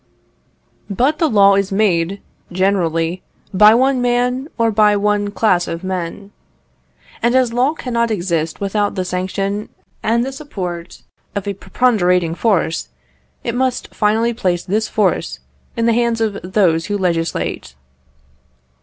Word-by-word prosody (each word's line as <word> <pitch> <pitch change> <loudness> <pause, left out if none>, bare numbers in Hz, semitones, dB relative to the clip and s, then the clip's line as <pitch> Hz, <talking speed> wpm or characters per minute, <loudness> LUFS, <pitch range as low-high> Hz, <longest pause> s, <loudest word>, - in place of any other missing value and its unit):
But 260 +10 +1
the 320 - +2
law 200 -4 +5
is 200 0 0
made, 195 -2 +1 0.3
generally, 175 -2 0 0.3
by 210 +3 +7
one 260 +1 +2
man, 245 +2 0
or 230 -1 +2
by 210 -1 +4
one 205 0 0
class 195 -4 +1
of 165 +2 -5
men. 185 +2 -5 0.9
And 240 +2 +2
as 255 -3 +2
law 255 +5 +2
cannot 235 -5 -1
exist 170 -6 -2
without 205 +1 -1
the 185 -2 -2
sanction 195 +3 -3 0.3
and 235 +2 +1
the 270 - -4
support 185 - -7 0.3
of 200 -1 -3
a 200 - -1
preponderating 180 -6 +1
force, 180 -4 0 0.5
it 235 - -2
must 255 0 -1
finally 225 +2 +1
place 180 -7 -1
this 215 +4 -1
force 175 - 0 0.4
in 230 - +1
the 230 - +3
hands 235 0 +1
of 215 -3 -1
those 180 -3 +1
who 205 0 -1
legislate. 165 - -2
205 Hz, 135 wpm, -18 LUFS, 180-235 Hz, 0.9 s, by